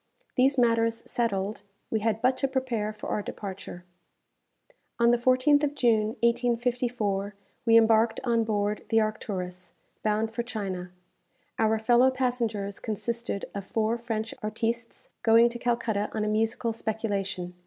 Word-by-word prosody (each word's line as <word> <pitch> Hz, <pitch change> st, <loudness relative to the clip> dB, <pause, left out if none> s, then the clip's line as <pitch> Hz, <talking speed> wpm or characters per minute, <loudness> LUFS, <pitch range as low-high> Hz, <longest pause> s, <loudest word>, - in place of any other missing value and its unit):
These 270 Hz, +2 st, +3 dB
matters 230 Hz, -1 st, +2 dB
settled, 205 Hz, -3 st, -1 dB, 0.3 s
we 220 Hz, -, +1 dB
had 220 Hz, 0 st, -1 dB
but 255 Hz, +1 st, +4 dB
to 275 Hz, -, +1 dB
prepare 255 Hz, -5 st, -1 dB
for 215 Hz, 0 st, -10 dB
our 210 Hz, -, 0 dB
departure. 190 Hz, -3 st, -7 dB, 1.1 s
On 235 Hz, 0 st, +4 dB
the 240 Hz, -, +4 dB
14th 255 Hz, +4 st, +4 dB
of 290 Hz, 0 st, 0 dB
June, 220 Hz, -3 st, +2 dB
1854, 235 Hz, -4 st, 0 dB, 0.3 s
we 230 Hz, 0 st, +7 dB
embarked 225 Hz, 0 st, +4 dB
on 235 Hz, -2 st, +2 dB
board 210 Hz, -1 st, -1 dB
the 225 Hz, -, +4 dB
"Arcturus," 185 Hz, -4 st, -3 dB, 0.3 s
bound 215 Hz, +1 st, 0 dB
for 235 Hz, -, -1 dB
China. 195 Hz, -6 st, -4 dB, 0.7 s
Our 220 Hz, 0 st, +3 dB
fellow 240 Hz, +3 st, +4 dB
passengers 235 Hz, -6 st, -2 dB
consisted 230 Hz, -1 st, -3 dB
of 200 Hz, -, -4 dB
four 220 Hz, +3 st, 0 dB
French 225 Hz, -1 st, -3 dB
artistes, 230 Hz, +2 st, -3 dB
going 230 Hz, +1 st, +6 dB
to 240 Hz, 0 st, -7 dB
Calcutta 235 Hz, -4 st, 0 dB
on 215 Hz, -1 st, -1 dB
a -, -, -1 dB
musical 225 Hz, +2 st, 0 dB
speculation. 200 Hz, -5 st, -3 dB
225 Hz, 140 wpm, -27 LUFS, 210-240 Hz, 1.1 s, we